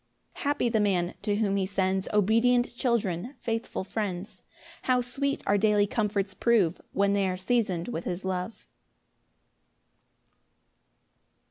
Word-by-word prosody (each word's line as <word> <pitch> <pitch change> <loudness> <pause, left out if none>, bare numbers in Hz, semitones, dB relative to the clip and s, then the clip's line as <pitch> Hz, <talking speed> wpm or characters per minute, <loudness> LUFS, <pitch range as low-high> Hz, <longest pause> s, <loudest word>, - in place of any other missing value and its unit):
4 - - -10
Happy 285 -3 +1
the 225 -2 +1
man 185 -4 +1
to 205 -2 0
whom 200 -2 +1
he 195 - +1
sends 190 -1 0
Obedient 230 +4 +3
children, 235 -1 -1
faithful 225 -4 -3
friends: 195 -2 -4 0.4
How 255 -1 +3
sweet 275 +3 -2
our 205 0 +3
daily 210 -1 +4
comforts 205 -2 -1
prove 205 -8 +2
When 200 0 +2
they 200 -1 +2
are 185 - -2
season'd 185 -4 0
with 175 -9 -4
his 180 +1 -4
love! 185 +3 -4
205 Hz, 130 wpm, -28 LUFS, 190-235 Hz, 0.4 s, daily